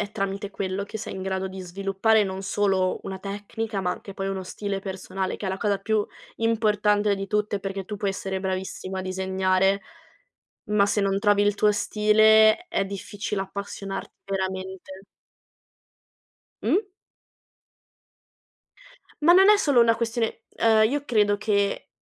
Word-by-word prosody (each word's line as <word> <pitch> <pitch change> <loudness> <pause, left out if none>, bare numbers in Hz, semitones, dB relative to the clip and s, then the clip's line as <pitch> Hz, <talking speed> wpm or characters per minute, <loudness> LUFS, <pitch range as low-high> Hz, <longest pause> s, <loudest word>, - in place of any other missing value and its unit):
è 205 -1 -3
tramite 195 -1 -3
quello 195 0 -3
che 210 +2 -6
sei 215 - -6
in 190 - -5
grado 190 0 -2
di 190 0 -7
sviluppare 195 +4 +1
non 190 0 -5
solo 195 -2 +1
una 190 -1 -6
tecnica, 205 +2 -4
ma 180 -1 0
anche 195 - -9
poi 195 0 -4
uno 195 -1 -3
stile 195 +1 -4
personale, 190 0 -4
che 205 - -5
è - - 0
la 190 - -2
cosa 200 0 0
più 215 -1 0 0.3
importante 210 -2 +2
di 195 0 -5
tutte, 210 -1 0
perché 195 0 -4
tu 210 +2 -6
puoi 200 -1 -1
essere 190 0 -4
bravissima 190 0 -4
a 185 - -3
disegnare, 190 +1 +1 0.9
ma 205 -1 +4
se 205 +1 +1
non 195 0 +1
trovi 205 -1 +3
il 205 0 +2
tuo 210 +1 +3
stile 215 - +4
è 195 - 0
difficile 200 +1 -4
appassionar 195 0 -6 0.2
veramente. 190 0 -5 1.6
Mh. 400 +2 +1 2.3
Ma 335 +3 +7
non 380 +2 +7
è 420 - +8
solo 285 -11 +3
una 230 -1 +4
questione 230 -1 -2 0.2
uhm, 220 -1 +5
io 285 +3 -2
credo 210 -6 +2
che 200 -1 0
200 Hz, 155 wpm, -25 LUFS, 190-215 Hz, 2.3 s, è